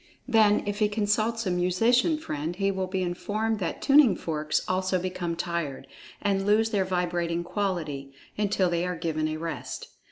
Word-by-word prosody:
Then, 215 Hz, -2 st, +4 dB
if 205 Hz, 0 st, -3 dB
he 210 Hz, -1 st, +3 dB
consults 215 Hz, +2 st, 0 dB
a 185 Hz, -, 0 dB
musician 225 Hz, -, +2 dB
friend, 165 Hz, -, -4 dB
he 195 Hz, +1 st, +1 dB
will 190 Hz, -1 st, -2 dB
be 185 Hz, 0 st, -1 dB
informed 210 Hz, +5 st, -1 dB
that 175 Hz, -, -3 dB
tuning 275 Hz, -6 st, +6 dB
forks 155 Hz, -2 st, -1 dB
also 185 Hz, 0 st, +1 dB
become 180 Hz, -2 st, -3 dB
tired, 170 Hz, -6 st, -3 dB, 0.4 s
and 195 Hz, -1 st, +1 dB
lose 215 Hz, +2 st, +3 dB
their 195 Hz, -3 st, +1 dB
vibrating 175 Hz, -2 st, -1 dB
quality, 170 Hz, -8 st, -3 dB, 0.2 s
until 205 Hz, -2 st, +1 dB
they 170 Hz, 0 st, 0 dB
are 180 Hz, 0 st, -2 dB
given 155 Hz, -2 st, -1 dB
a 155 Hz, 0 st, -3 dB
rest. 165 Hz, 0 st, -5 dB
185 Hz, 165 wpm, -27 LUFS, 170-210 Hz, 0.4 s, tuning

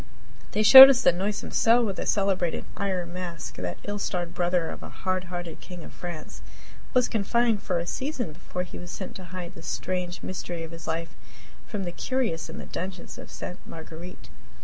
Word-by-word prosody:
They 215 Hz, -, +2 dB
showed 265 Hz, +4 st, +13 dB
us 255 Hz, -2 st, +3 dB
the -, -, +6 dB
noisome 195 Hz, +4 st, -3 dB
cell 235 Hz, +1 st, +4 dB
where 200 Hz, -, -1 dB
the -, -, -5 dB
celebrated 190 Hz, -4 st, 0 dB
"Iron 180 Hz, -3 st, -2 dB
Mask" 175 Hz, -3 st, -6 dB
that 90 Hz, -1 st, -4 dB
ill 205 Hz, 0 st, -4 dB
starred 175 Hz, -3 st, -2 dB
brother 175 Hz, -1 st, 0 dB
of -, -, -8 dB
a -, -, -8 dB
hardhearted 180 Hz, -3 st, -4 dB
king 180 Hz, -2 st, -10 dB
of -, -, -11 dB
France 175 Hz, -3 st, -8 dB, 0.5 s
was 250 Hz, -1 st, +4 dB
confined 225 Hz, 0 st, +1 dB
for 180 Hz, -, -1 dB
a 170 Hz, -, -2 dB
season 255 Hz, -, -3 dB
before 180 Hz, +2 st, -5 dB
he 180 Hz, -, -9 dB
was 175 Hz, -, -9 dB
sent 190 Hz, -, -6 dB
to 185 Hz, -, -10 dB
hide 180 Hz, 0 st, -7 dB
the 165 Hz, -, -11 dB
strange 180 Hz, +2 st, -3 dB
mystery 175 Hz, -2 st, -5 dB
of 165 Hz, -, -8 dB
his 165 Hz, -1 st, -10 dB
life 165 Hz, -3 st, -3 dB, 0.5 s
from 205 Hz, -4 st, -4 dB
the 175 Hz, -, -4 dB
curious 230 Hz, -4 st, -2 dB
in -, -, -8 dB
the -, -, -7 dB
dungeons 185 Hz, 0 st, -6 dB
of -, -, -10 dB
Ste. 180 Hz, -, -8 dB
Marguerite. 165 Hz, +2 st, -10 dB
180 Hz, 195 wpm, -26 LUFS, 170-200 Hz, 0.5 s, showed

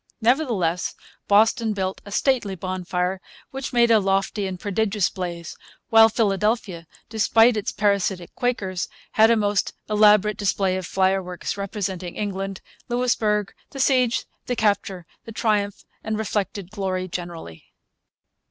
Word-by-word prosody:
Nevertheless 225 Hz, -, +1 dB, 0.3 s
Boston 220 Hz, +2 st, +3 dB
built 190 Hz, -1 st, -3 dB
a -, -, -9 dB
'stately 230 Hz, -4 st, +1 dB
bonfire,' 185 Hz, 0 st, -3 dB, 0.3 s
which 270 Hz, 0 st, -5 dB
made 235 Hz, -1 st, +4 dB
a 220 Hz, -, +6 dB
'lofty 195 Hz, +1 st, 0 dB
and 185 Hz, -1 st, -6 dB
prodigious 205 Hz, -1 st, 0 dB
blaze'; 170 Hz, -3 st, -5 dB, 0.4 s
while 225 Hz, 0 st, +8 dB
Philadelphia, 210 Hz, -5 st, 0 dB, 0.2 s
despite 225 Hz, +1 st, +4 dB
its 210 Hz, 0 st, -2 dB
parasitic 200 Hz, -4 st, 0 dB
Quakers, 195 Hz, -7 st, -2 dB, 0.2 s
had 220 Hz, +1 st, +5 dB
a 230 Hz, -, +5 dB
most 205 Hz, -2 st, 0 dB
elaborate 210 Hz, -1 st, +4 dB
display 195 Hz, -2 st, 0 dB
of 185 Hz, -2 st, -4 dB
fireworks 190 Hz, -1 st, -1 dB
representing 195 Hz, -3 st, -4 dB
England, 195 Hz, -2 st, -4 dB, 0.3 s
Louisbourg, 220 Hz, -4 st, 0 dB, 0.2 s
the 275 Hz, -, -9 dB
siege, 255 Hz, -3 st, +2 dB, 0.2 s
the 245 Hz, -, -1 dB
capture, 200 Hz, -5 st, 0 dB, 0.2 s
the 225 Hz, -, -8 dB
triumph, 210 Hz, -2 st, -1 dB, 0.2 s
and 220 Hz, -1 st, -2 dB
reflected 200 Hz, -3 st, -3 dB
glory 190 Hz, -3 st, -2 dB
generally. 170 Hz, -, -7 dB
200 Hz, 125 wpm, -23 LUFS, 185-220 Hz, 0.4 s, while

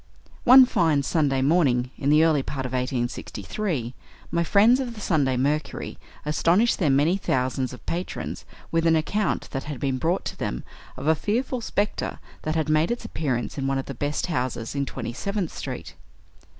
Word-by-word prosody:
One 255 Hz, +1 st, +10 dB
fine 160 Hz, -, +2 dB
Sunday 135 Hz, -3 st, +1 dB
morning, 135 Hz, -5 st, +2 dB
in 140 Hz, -, -1 dB
the 155 Hz, +2 st, +6 dB
early 155 Hz, -3 st, +3 dB
part 135 Hz, -1 st, -4 dB
of 130 Hz, -, -4 dB
1863, 125 Hz, -, -2 dB, 0.4 s
my 170 Hz, -, +1 dB
friends 215 Hz, +9 st, +5 dB
of 245 Hz, -3 st, -3 dB
the -, -, -9 dB
"Sunday 145 Hz, -10 st, +1 dB
Mercury" 145 Hz, +3 st, -2 dB, 0.3 s
astonished 170 Hz, +9 st, +3 dB
their 165 Hz, -7 st, +2 dB
many 145 Hz, +7 st, +3 dB
thousands 130 Hz, -6 st, -1 dB
of 125 Hz, -, -11 dB
patrons 175 Hz, +2 st, -4 dB, 0.3 s
with 165 Hz, 0 st, +2 dB
an 165 Hz, -, +5 dB
account 200 Hz, +7 st, 0 dB
that 135 Hz, -, -4 dB
had 145 Hz, -3 st, -5 dB
been 135 Hz, -2 st, -1 dB
brought 170 Hz, +6 st, 0 dB
to -, -, -4 dB
them -, -, -3 dB, 0.3 s
of 130 Hz, -, -6 dB
a 160 Hz, -, +5 dB
fearful 235 Hz, -, -1 dB
spectre 205 Hz, -2 st, -2 dB, 0.2 s
that 155 Hz, +1 st, -2 dB
had 160 Hz, -1 st, 0 dB
made 155 Hz, +1 st, +3 dB
its 240 Hz, -1 st, -3 dB
appearance 140 Hz, -, -2 dB
in 135 Hz, -, -1 dB
one 135 Hz, 0 st, +1 dB
of 135 Hz, -, -3 dB
the 135 Hz, -, -6 dB
best 145 Hz, +4 st, -2 dB
houses 125 Hz, -8 st, -2 dB
in 140 Hz, -1 st, -1 dB
Twenty 120 Hz, -, -5 dB
seventh 200 Hz, -, -3 dB
Street. 85 Hz, -, -6 dB
150 Hz, 180 wpm, -25 LUFS, 130-175 Hz, 0.4 s, One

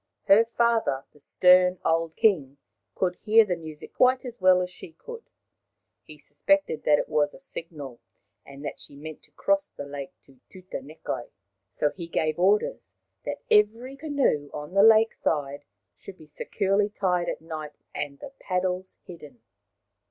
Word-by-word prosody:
Her 200 Hz, +3 st, +6 dB
father, 230 Hz, -, 0 dB
the 150 Hz, -, -21 dB
stern 180 Hz, +4 st, +4 dB
old 165 Hz, 0 st, +1 dB
king, 145 Hz, -11 st, +2 dB, 0.4 s
could 180 Hz, -2 st, 0 dB
hear 220 Hz, +1 st, +5 dB
the 180 Hz, -3 st, -1 dB
music 160 Hz, -2 st, -10 dB
quite 255 Hz, +1 st, +3 dB
as 240 Hz, -4 st, -8 dB
well 185 Hz, 0 st, +6 dB
as 180 Hz, -, -6 dB
she 170 Hz, -, -11 dB
could. 465 Hz, -, -11 dB, 0.7 s
He -, -, -14 dB
suspected 295 Hz, -, 0 dB
that 150 Hz, -1 st, +5 dB
it -, -, -2 dB
was 145 Hz, -1 st, +1 dB
a -, -, -14 dB
signal, 155 Hz, -, -8 dB, 0.4 s
and 140 Hz, +1 st, -11 dB
that -, -, -5 dB
she -, -, -11 dB
meant 155 Hz, +2 st, -9 dB
to -, -, -18 dB
cross 195 Hz, 0 st, 0 dB
the 145 Hz, -, -8 dB
lake 140 Hz, -1 st, -7 dB
to 135 Hz, -2 st, -22 dB
Tutanekai. 155 Hz, -8 st, -7 dB, 0.4 s
So 145 Hz, +8 st, 0 dB
he 170 Hz, -3 st, -8 dB
gave 155 Hz, -1 st, -1 dB
orders 210 Hz, -, +1 dB, 0.3 s
that -, -, -5 dB
every 225 Hz, +5 st, +3 dB
canoe 275 Hz, -, 0 dB
on 150 Hz, +3 st, -7 dB
the 195 Hz, -, +5 dB
lake 220 Hz, +1 st, +6 dB
side 145 Hz, -2 st, -2 dB, 0.3 s
should 190 Hz, -, -12 dB
be 155 Hz, -, -15 dB
securely 195 Hz, +7 st, 0 dB
tied 180 Hz, -4 st, 0 dB
at -, -, -4 dB
night 155 Hz, -2 st, -8 dB, 0.2 s
and 140 Hz, -1 st, -4 dB
the 270 Hz, -, -10 dB
paddles 185 Hz, 0 st, -2 dB
hidden. 150 Hz, -9 st, -13 dB
180 Hz, 160 wpm, -26 LUFS, 150-210 Hz, 0.7 s, Her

